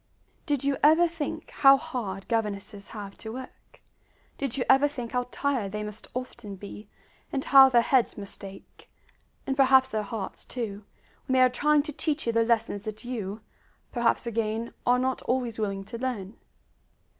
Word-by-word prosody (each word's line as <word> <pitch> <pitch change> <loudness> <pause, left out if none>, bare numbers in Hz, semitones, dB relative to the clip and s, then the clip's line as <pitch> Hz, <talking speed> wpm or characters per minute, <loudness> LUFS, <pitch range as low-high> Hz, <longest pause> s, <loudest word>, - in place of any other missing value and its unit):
Did 285 -4 0
you 275 -1 +1
ever 320 +4 +6
think 325 -3 -5
how 275 -1 +7
hard 200 -8 -5
governesses 210 -3 -3
have 200 -3 -8
to 220 - -6
work? 255 +1 -11 0.6
Did 275 -2 -2
you 250 - +1
ever 270 +2 +6
think 250 -5 -6
how 250 -1 -1
tired 250 -8 -1
they 210 0 -3
must 210 +1 -8
often 240 -5 -6
be, 205 +2 -10 0.4
and 270 -1 -2
how 270 -1 +8
their 240 -2 +4
heads 255 -2 +2
must 200 -1 -9
ache 195 0 -12 0.6
and 270 - -1
perhaps 265 -1 +5
their 220 -3 -1
hearts, 210 -1 -6
too 210 -5 -5 0.4
when 260 - 0
they 260 - +5
are 255 - +7
trying 295 +3 +3
to 300 0 -6
teach 305 +1 -2
you 230 - 0
the 230 0 +4
lessons 225 -3 0
that 215 0 -6
you 215 -4 -4 0.5
perhaps 240 -1 +1
again 225 0 -2
are 245 +1 +5
not 260 +1 -1
always 245 -3 -1
willing 195 -2 -2
to 230 +4 -8
learn? 230 -5 -3
235 Hz, 175 wpm, -27 LUFS, 210-265 Hz, 0.6 s, how